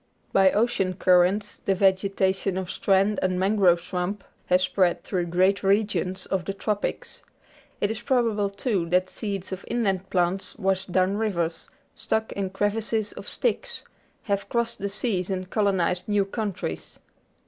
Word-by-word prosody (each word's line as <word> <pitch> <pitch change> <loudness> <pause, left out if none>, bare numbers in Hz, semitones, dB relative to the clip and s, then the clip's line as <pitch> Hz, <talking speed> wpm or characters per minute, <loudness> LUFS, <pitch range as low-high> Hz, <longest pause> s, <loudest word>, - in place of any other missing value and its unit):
By 195 -1 +6
ocean 205 -4 +1
currents 185 +3 +2
the 195 - +2
vegetation 190 0 +1
of 185 -1 -3
strand 195 +1 +2
and 185 -1 0
mangrove 190 -3 +4
swamp 180 +3 -3 0.2
has 180 +1 +3
spread 185 -2 +1
through 180 -2 -2
great 185 +3 +2
regions 195 -2 +1
of 190 -2 -1
the 195 - -3
Tropics. 205 0 -3 0.6
It 205 - +1
is 220 +1 -5
probable, 230 -5 +1
too, 200 -4 -1
that 180 +1 +2
seeds 200 -4 -5
of 190 0 -5
inland 195 -5 -1
plants 180 +1 0
washed 190 -3 -1
down 185 +2 +2
rivers, 175 -7 -2 0.2
stuck 220 0 -1
in 195 -1 -2
crevices 210 +2 -1
of - - -10
sticks, 485 0 -2 0.4
have 200 -2 -2
crossed 235 -1 -1
the 200 - -2
seas 200 -3 -2
and 185 -1 -3
colonised 190 -4 +1
new 205 -2 +2
countries. 200 -2 -4
195 Hz, 150 wpm, -25 LUFS, 185-210 Hz, 0.6 s, By